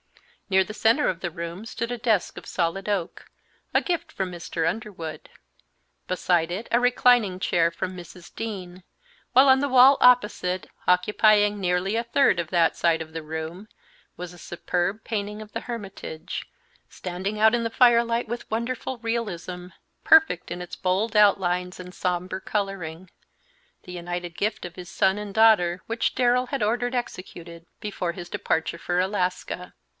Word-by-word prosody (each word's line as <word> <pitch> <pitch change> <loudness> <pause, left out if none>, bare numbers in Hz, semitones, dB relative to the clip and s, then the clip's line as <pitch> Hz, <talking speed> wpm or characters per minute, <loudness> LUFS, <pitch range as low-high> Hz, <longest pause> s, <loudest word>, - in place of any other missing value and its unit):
Near 190 0 +4
the 215 - -7
centre 225 +7 +3
of 175 -1 -2
the 175 - -3
room 170 +3 -6
stood 230 +1 -4
a - - -4
desk 225 -5 0
of - - -9
solid 185 +3 -2
oak, 190 -5 -3 0.4
a - - +5
gift 340 -3 -2
from 190 -7 -3
Mr. 165 -1 -3
Underwood; 175 -4 -5 0.8
beside 175 -2 +1
it 200 +6 -4
a 240 - +4
reclining 245 -6 +3
chair 170 -2 +2
from 185 +2 -4
Mrs. 175 0 -12
Dean, 185 -5 -6 0.5
while 260 +2 +6
on 265 0 +6
the 285 +1 0
wall 260 +2 +7
opposite, 210 -7 +3 0.2
occupying 205 +3 +4
nearly 180 +3 0
a 230 - 0
third 240 0 +3
of 170 -2 -3
that 170 -2 +3
side 165 -2 +2
of 160 0 -8
the 165 - -4
room, 160 +6 -6 0.5
was 180 0 -7
a - - -13
superb 180 +5 -2
painting 210 -1 -3
of 215 -1 -12
the 230 - -3
Hermitage, 195 -8 -6 0.4
standing 190 +4 -5
out 220 +2 +5
in 235 - -1
the 230 - -1
firelight 235 0 +3
with 240 +2 -6
wonderful 240 +3 -3
realism, 205 -7 -4 0.4
perfect 320 - +4
in 175 +1 -4
its 180 - -7
bold 195 +5 -1
outlines 180 -3 +3
and 180 0 -9
sombre 180 +1 -2
coloring, 185 -4 -4 0.7
the 180 - -10
united 175 -1 -5
gift 210 +1 -2
of 175 -1 -8
his 180 -1 -9
son 190 +1 +2
and 205 -1 -6
daughter, 195 -5 +4
which 230 +1 -1
Darrell 250 0 +2
had 270 -3 -2
ordered 245 +4 0
executed 170 -7 -6
before 190 -5 -3
his 175 -1 -8
departure 165 -1 -2
for 175 +1 -1
Alaska. 185 -1 -2
190 Hz, 160 wpm, -25 LUFS, 175-230 Hz, 0.8 s, wall